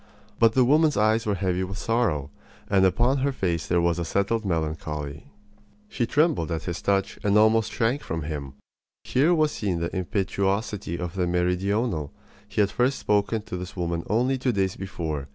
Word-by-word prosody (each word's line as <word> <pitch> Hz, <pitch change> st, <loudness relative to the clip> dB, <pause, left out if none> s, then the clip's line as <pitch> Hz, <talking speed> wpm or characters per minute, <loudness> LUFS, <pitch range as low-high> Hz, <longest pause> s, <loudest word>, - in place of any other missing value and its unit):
But 115 Hz, -1 st, +5 dB
the 130 Hz, 0 st, +4 dB
woman's 150 Hz, +2 st, +4 dB
eyes 110 Hz, +2 st, +2 dB
were 105 Hz, -, +1 dB
heavy 90 Hz, 0 st, -1 dB
with 95 Hz, +1 st, -5 dB
sorrow, 100 Hz, -, 0 dB, 0.4 s
and 95 Hz, -1 st, +3 dB
upon 120 Hz, +9 st, +2 dB
her 140 Hz, +2 st, +1 dB
face 85 Hz, -, -2 dB
there 90 Hz, -, +2 dB
was 85 Hz, 0 st, +1 dB
a -, -, -1 dB
settled 100 Hz, +6 st, 0 dB
melancholy. 80 Hz, -4 st, -3 dB, 0.6 s
She 120 Hz, -, -1 dB
trembled 150 Hz, -, +2 dB
at 80 Hz, -, -2 dB
his 85 Hz, -2 st, -4 dB
touch 100 Hz, -1 st, 0 dB
and 105 Hz, 0 st, +3 dB
almost 110 Hz, +1 st, +4 dB
shrank 120 Hz, +6 st, 0 dB
from 80 Hz, -1 st, -4 dB
him. 70 Hz, -3 st, -5 dB, 0.5 s
Here 145 Hz, +7 st, +2 dB
was 155 Hz, -2 st, +2 dB
seen 95 Hz, -5 st, -2 dB
the 85 Hz, +3 st, -3 dB
impetuosity 100 Hz, 0 st, -1 dB
of 90 Hz, -1 st, -4 dB
the 90 Hz, -2 st, 0 dB
meridional. 90 Hz, -, 0 dB, 0.4 s
He 105 Hz, +1 st, 0 dB
had 100 Hz, -1 st, +2 dB
first 125 Hz, +5 st, +1 dB
spoken 105 Hz, +1 st, 0 dB
to 90 Hz, -, -6 dB
this 90 Hz, +1 st, -7 dB
woman 85 Hz, -2 st, -2 dB
only 125 Hz, +5 st, +1 dB
two 130 Hz, 0 st, +1 dB
days 95 Hz, -3 st, 0 dB
before. 80 Hz, -7 st, -4 dB
100 Hz, 180 wpm, -25 LUFS, 85-115 Hz, 0.6 s, But